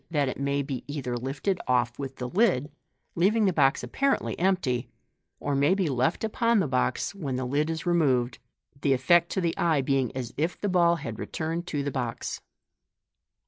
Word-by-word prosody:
that 145 -4 +1
it 130 - -4
may 140 0 0
be 135 -3 -5
either 135 -4 -3
lifted 140 +10 -2
off 120 -1 +1
with 135 -1 -5
the 125 - -4
lid, 165 - +2 0.4
leaving 210 +6 +3
the 190 - +2
box 135 -4 +3
apparently 275 0 0
empty, 170 -10 +1 0.5
or 145 - -2
may 140 +6 +3
be 190 -4 0
left 130 - 0
upon 230 +1 +2
the 185 - +1
box 130 +4 0
when 150 -10 -4
the 130 0 -2
lid 145 +5 0
is 165 +1 -3
removed, 130 -9 +2 0.4
the 140 - +3
dcct 170 +7 +4
to 190 - -2
the 170 -2 0
eye 160 -4 +3
being 135 -2 +1
as 125 -2 -4
if 160 +5 -1
the 205 - -1
ball 175 -3 +4
had 115 -9 -6
returned 165 +2 -3
to 145 -4 -2
th<r 140 - -2
box. 125 -3 -3
145 Hz, 185 wpm, -27 LUFS, 130-175 Hz, 0.5 s, dcct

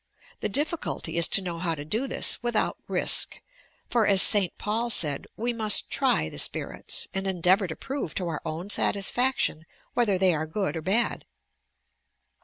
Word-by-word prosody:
The - - -3
difficulty 310 - -2
is 170 -1 +6
to 195 - +1
know 170 -2 -5
how 165 -1 -2
to 145 -1 -9
do 225 - -2
this - - +2
without 240 -2 -1
risk, - - +2 0.5
for, 230 -3 +1
as 195 -2 +5
St. 195 -2 +6
Paul 225 +3 -2
said, 150 -10 +2
we 240 +2 -2
must 220 -2 +2
"try 80 - +1
the - - -5
spirits" - - -1
and 195 0 -3
endeavour 185 +2 +2
to 160 - -7
prove 270 - -6
to 180 - -3
our 160 -3 -4
own 175 +6 -6
satisfaction 200 -3 0 0.3
whether 215 -6 +1
they 185 -1 +3
are 155 0 -3
good 190 +3 -3
or 160 - -4
bad. 210 +8 0
195 Hz, 170 wpm, -25 LUFS, 170-230 Hz, 0.5 s, is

